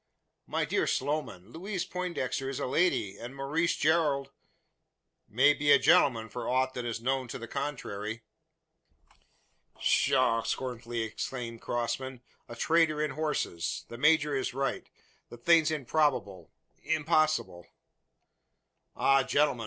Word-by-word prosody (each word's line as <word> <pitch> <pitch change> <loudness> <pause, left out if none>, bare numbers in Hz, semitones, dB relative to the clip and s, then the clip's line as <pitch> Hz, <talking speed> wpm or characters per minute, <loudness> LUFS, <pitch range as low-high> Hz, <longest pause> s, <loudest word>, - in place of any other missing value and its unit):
"My - - -1
dear - - 0
Sloman, 130 -9 -2
Louise 185 - -4
Poindexter 170 -8 -3
is 135 - -4
a - - -2
lady, 125 - +1
and 120 +3 -8
Maurice 150 +5 0
Gerald 145 -3 +1 0.5
" - - -54
"May 145 +2 +7
be 145 0 +1
a 140 - +9
gentleman 130 -6 +4
for 120 +3 -5
aught 130 +1 +1
that 125 -2 -5
is 115 -1 -3
known 130 +2 -1
to - - -6
the 115 - -8
contrary." 115 -5 -4 1.5
"Pshaw!" 115 0 +3
scornfully 120 -1 -3
exclaimed 115 +1 -5
Crossman; 125 +1 -3 0.3
"a 120 - -7
trader 160 +3 +2
in 150 0 0
horses! 150 - -2
The 120 - -8
major 150 0 +4
is 130 -1 -2
right 135 0 -2 0.4
the 120 - -10
thing's 160 +5 +4
improbable 135 -9 0 0.3
impossible." 155 - +1 1.3
"Ah, 135 0 +4
gentlemen!" 140 -1 +1
135 Hz, 130 wpm, -29 LUFS, 120-155 Hz, 1.5 s, a